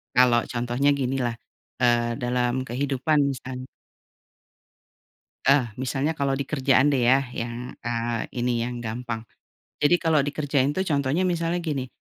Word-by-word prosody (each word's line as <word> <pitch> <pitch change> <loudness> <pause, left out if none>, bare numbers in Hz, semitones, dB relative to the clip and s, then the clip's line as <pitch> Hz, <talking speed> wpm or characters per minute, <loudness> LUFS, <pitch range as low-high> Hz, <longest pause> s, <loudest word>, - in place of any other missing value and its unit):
kalau 125 -1 +6
contohnya 120 +3 +1
ginilah, 125 -2 -1 0.5
eee, 120 -1 +2
dalam 125 0 +1
kehidupan 140 +4 0
misalnya 130 0 -7 1.8
eh, 140 -1 +6 0.2
misalnya 135 +4 0
kalau 135 -1 +1
di 140 - -2
kerjaan 135 0 +3
deh 135 - +2
ya 135 +2 +5
yang, 120 +2 -5
eee, 115 -1 -2
ini 120 -1 0
yang 120 0 -5
gampang. 115 0 -4 0.6
Jadi 150 +4 +5
kalau 160 -2 +3
dikerjain 145 -1 +1
tuh 190 - +1
contohnya 145 +1 +1
misalnya 170 -1 0
gini, 140 -5 -2
130 Hz, 130 wpm, -25 LUFS, 120-145 Hz, 1.8 s, kalau